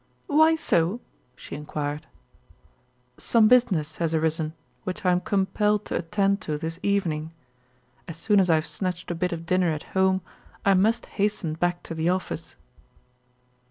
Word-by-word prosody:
"Why 315 +2 +5
so?" 190 - +1 0.4
she - - -11
inquired. 150 0 -4 1.1
"Some 225 -2 +4
business 190 -11 +3
has 165 -1 0
arisen 160 0 0 0.3
which 185 +1 -5
I 180 - +5
am 180 - +3
compelled 210 +2 +1
to - - -4
attend 200 +3 0
to 155 -4 -3
this 165 +2 -5
evening. 165 -6 -1 0.7
As 165 -2 -7
soon 205 +4 +3
as 185 -2 +3
I 165 - +6
have 155 0 0
snatched 180 -2 -4
a - - 0
bit 180 +2 -1
of 165 -1 -5
dinner 180 0 +2
at 155 -2 -3
home 190 0 +3 0.4
I 200 - +5
must 210 +5 +2
hasten 205 -6 -1
back 175 +2 -1
to - - -6
the 160 +1 0
office." 180 -3 -3
180 Hz, 160 wpm, -25 LUFS, 160-200 Hz, 1.1 s, I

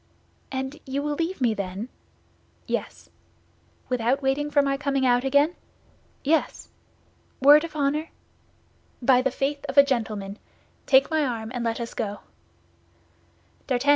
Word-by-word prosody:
"And 265 +3 -4
you 275 +2 -2
will 295 0 -1
leave 330 +1 -3
me 235 -3 +3
then?" 200 +2 -5 0.8
"Yes." - - -4 0.8
"Without 250 +3 0
waiting 275 +2 0
for 290 -1 +3
my 275 0 +1
coming 275 -1 0
out 245 0 +3
again?" 285 +5 +3 0.7
"Yes." 315 +3 0 0.7
"Word 290 +3 +7
of 330 -2 -7
honor?" 300 +2 0 0.9
"By 250 0 +4
the 265 - +1
faith 280 +2 -2
of - - -5
a 280 - +10
gentleman. 215 -6 -3 0.5
Take 270 +3 +5
my 315 -1 +2
arm, 230 -4 -3
and 245 -2 -3
let 230 0 -1
us 235 -1 -5
go." 205 -3 -4
270 Hz, 135 wpm, -25 LUFS, 240-290 Hz, 0.9 s, a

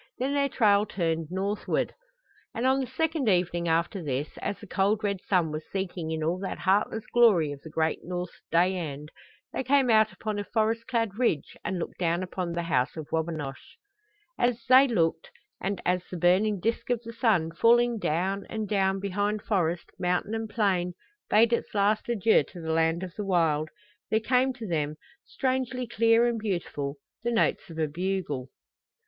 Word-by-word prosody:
Then 265 +3 -1
their 280 -1 +2
trail 210 -4 +3
turned 165 -4 -1
northward, 195 +3 -1 0.6
and 235 - -1
on 265 +1 +3
the 265 - -2
second 310 -1 0
evening 175 -2 +1
after 170 +4 0
this, 140 0 -2
as 200 - -3
the 210 - -10
cold 205 +2 +1
red 200 -2 -1
sun 175 -5 +2
was 155 +1 -4
sinking 180 -4 -3
in 160 -1 -2
all 170 +4 0
that 195 - -5
heatless 205 +3 +1
glory 205 -11 +5
of 140 -1 -8
the 160 - -10
great 160 0 0
North's 180 0 -5
day 180 +3 +3
end, 150 -3 -5 0.4
they - - -2
came 265 -2 +3
out 220 -1 +5
upon 215 -2 -4
a - - -2
forest 225 +2 0
clad 230 -4 -1
ridge 200 - 0
and 190 - -2
looked 170 - -5
down 170 0 +1
upon 180 -1 -4
the 170 0 -2
House 135 -3 0
of 155 -2 -7
Wabinosh. 160 -4 -4 0.6
And 240 - +4
as 240 0 -7
they 260 +2 +7
looked 225 - 0 0.3
and 195 0 -2
as 180 0 +2
the 180 - -5
burning 190 +4 +3
disk 230 +6 -2
of 240 -1 0
the 230 0 -8
sun, 205 -9 +2
falling 235 +5 +3
down 190 +4 -1
and 220 -1 -3
down 195 -1 +1
behind 205 +2 -1
forest, 175 -5 -1
mountain 180 +3 0
and 225 -1 -3
plain, 185 -5 0 0.3
bade 230 +2 +5
its 235 - -2
last 210 +3 +2
adieu 225 -1 +4
to 180 - -11
the 160 -1 -3
land 165 +2 +1
of 180 -2 -6
the 210 - -4
wild, 165 -5 +1 0.4
there 220 - +3
came 255 +3 +2
to 240 -3 -8
them, 155 -5 -1 0.3
strangely 255 -1 -1
clear 230 0 +3
and 235 -1 0
beautiful, 170 -9 -3 0.3
the 235 - -1
notes 225 -4 +1
of 165 - -9
a 160 -1 +1
bugle. 165 -5 -3
195 Hz, 185 wpm, -27 LUFS, 170-225 Hz, 0.6 s, they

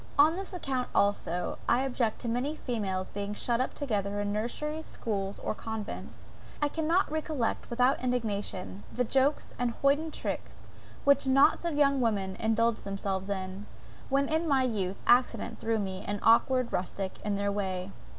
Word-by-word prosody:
On 300 +3 +7
this 385 +2 -5
account 270 -8 -2
also, 180 -3 +1
I 240 - +4
object 245 -4 -1
to 240 - -4
many 250 +6 0
females 200 -9 -2
being 205 +1 -4
shut 240 +3 +1
up 255 - -2
together 205 -7 -1
in 205 0 -1
nurseries, 300 +9 -3
schools, 200 -3 -3
or - - -2
convents. 220 -1 -6 0.3
I 295 - +2
cannot 325 +3 +1
recollect 310 -6 -1
without 250 +2 +2
indignation, 205 -6 -2
the 250 - 0
jokes 270 +4 +1
and 245 -1 +2
hoiden 290 +3 +3
tricks, - - -5 0.4
which 280 -1 +4
knots 275 +5 +5
of 335 -3 0
young 280 -2 +4
women 200 -5 0
indulged 225 +1 +1
themselves 195 -1 -3
in, 190 +1 -4 0.4
when 275 +1 +2
in 320 +2 0
my 275 -3 +3
youth 200 -6 -1
accident 240 -2 +3
threw 225 0 0
me, 190 -2 -3
an 205 0 -1
awkward 250 +2 +4
rustic, 190 +1 -3
in 205 -1 0
their 200 0 0
way. 190 -2 -2
230 Hz, 160 wpm, -30 LUFS, 200-275 Hz, 0.4 s, On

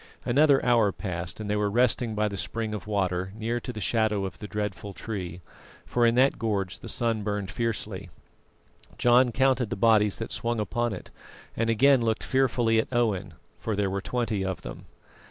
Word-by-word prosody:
Another 140 +2 +4
hour 115 -5 +4
passed, 90 -3 -5
and 110 - -5
they 105 - 0
were 105 0 +1
resting 120 0 +1
by 105 0 +1
the 100 - -4
spring 110 +3 -3
of 105 -1 -6
water, 95 -3 -1
near 115 +2 -2
to 125 - -6
the 110 - -7
shadow 105 0 +1
of 95 - -7
the 105 - -6
dreadful 105 -2 -4
tree, 90 -6 -5 0.4
for 120 -1 +2
in 115 - +2
that 130 +2 +3
gorge 100 -5 -1
the - - -9
sun 115 -2 0
burned 105 -2 -3
fiercely. 105 -4 -3 0.9
John 120 +1 +5
counted 130 -1 +2
the - - -2
bodies 105 -1 +3
that 115 - -5
swung 120 -1 -1
upon 120 +2 -1
it, 95 - -8 0.4
and 115 0 0
again 130 +3 +5
looked 110 -1 0
fearfully 120 -4 +2
at 110 - -2
Owen, 105 -7 0 0.2
for 110 - -2
there 100 -1 0
were 100 0 -2
twenty 115 -3 -1
of 95 -1 -3
them. - - -8
110 Hz, 190 wpm, -27 LUFS, 100-120 Hz, 0.9 s, John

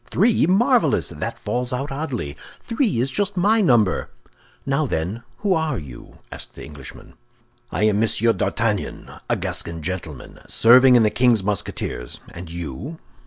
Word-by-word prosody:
"Three? 210 -3 +3
Marvelous! 240 +7 +3
That - - -5
falls 125 0 -3
out 135 +3 -3
oddly! 135 - -4 0.2
Three 230 - -1
is 130 +3 0
just 205 +4 -2
my 215 +5 +3
number!" 115 - +2 0.6
"Now, 140 +2 0
then, 90 +5 -3 0.2
who 205 -2 +1
are 160 -6 0
you?" 70 -8 -11
asked - - -9
the - - -9
Englishman. 70 -3 -12 0.6
"I - - -1
am 105 -1 +3
Monsieur 115 +1 +3
d'Artagnan, 110 -3 -2 0.2
a - - +2
Gascon 85 -2 -2
gentleman, 85 -5 -6
serving 125 +2 +6
in 120 - +6
the 105 - +3
king's 120 -5 +3
Musketeers. 95 -10 -3
And 85 0 -9
you?" 85 - -6
120 Hz, 150 wpm, -22 LUFS, -, 0.6 s, serving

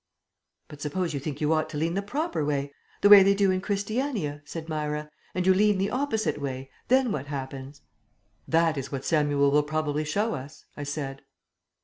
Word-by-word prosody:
"But 145 -1 -12
suppose 165 +3 -2
you 140 - -2
think 145 +1 -5
you 150 +1 +3
ought 155 0 0
to 150 - -5
lean 165 +3 0
the 195 - 0
proper 280 - -2
way, 140 -1 -1 0.3
the 205 - +6
way 205 -1 +11
they 195 +1 +4
do 195 -1 +3
in 185 0 0
Christiania," 205 - -2
said 160 +1 -7
Myra, 150 -1 -3 0.2
"and 180 0 0
you 190 - +6
lean 205 +1 +3
the 195 +2 0
opposite 220 - -1
way, 135 -1 -5 0.2
then 260 -2 +3
what 140 -4 -3
happens?" 135 0 -6 0.6
"That 165 -2 +2
is 135 - -6
what 135 -1 -4
Samuel 145 -3 +2
will 150 +1 +5
probably 150 0 -1
show 205 +9 0
us," 140 +4 -8
I 145 - -5
said. 140 -1 -4
155 Hz, 195 wpm, -27 LUFS, 145-195 Hz, 0.6 s, way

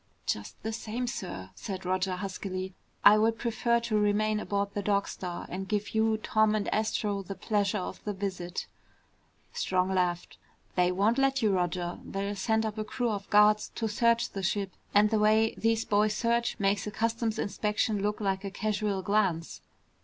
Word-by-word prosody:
"Just 105 - -3
the 220 +1 -2
same, 230 +2 -3
sir," 95 - -5
said 185 - -6
Roger 185 0 0
huskily, 185 0 -4 0.3
"I 210 - +9
would 225 +1 +2
prefer 235 0 +1
to 230 -2 -2
remain 210 +1 +2
aboard 200 -1 -2
the 205 - -2
Dog 200 0 +1
Star 180 -2 -5
and 190 +2 -5
give 210 0 -2
you, 220 0 +2
Tom, 215 0 +2
and 210 -2 -1
Astro 215 -2 0
the 195 +1 -7
pleasure 205 -1 0
of 185 - -5
the 210 - -2
visit." 185 -3 -4 0.9
Strong 185 0 0
laughed. 175 -2 -1 0.3
"They 180 0 +3
won't 210 +7 +2
let 270 -2 +2
you, 215 - +4
Roger. 175 -1 -1
They'll 200 +1 -3
send 220 +3 +1
up 215 0 -3
a - - 0
crew 240 +2 -1
of 200 -1 -5
guards 210 0 +5
to 225 - -1
search 235 +2 +2
the 195 - -4
ship. 195 +1 -1 0.2
And 210 +1 +4
the 220 - +3
way 220 +1 +4
these 225 0 +1
boys 210 +1 +2
search 235 +1 +1
makes 200 0 +1
a - - -3
customs 225 0 -1
inspection 210 0 0
look 210 +1 -1
like 195 -2 -1
a 200 - -3
casual 205 -1 -1
glance." 190 -5 0
210 Hz, 180 wpm, -29 LUFS, 190-220 Hz, 0.9 s, I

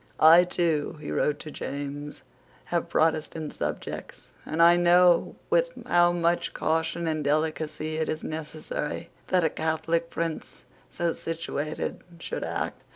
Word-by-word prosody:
"I, 165 +3 +8
too," 165 -3 0
he 150 - -6
wrote 150 -1 +1
to 155 - -7
James, 145 +1 -6 0.5
"have - - 0
Protestant 155 -1 0
subjects; - - -5 0.2
and 160 - -3
I 170 +1 +8
know 175 0 +4 0.2
with - - +3 0.2
how 175 0 +4
much 175 0 0
caution 165 +1 0
and 155 -1 -1
delicacy 155 +1 -1
it 160 - -1
is 155 - -3
necessary 155 -1 -5 0.2
that 180 -2 +2
a 160 - +3
Catholic 165 +1 -1
prince 165 -2 -4 0.2
so 170 -1 -1
situated 160 -2 -4 0.2
should - - -4
act." - - -3
160 Hz, 135 wpm, -27 LUFS, 155-170 Hz, 0.5 s, I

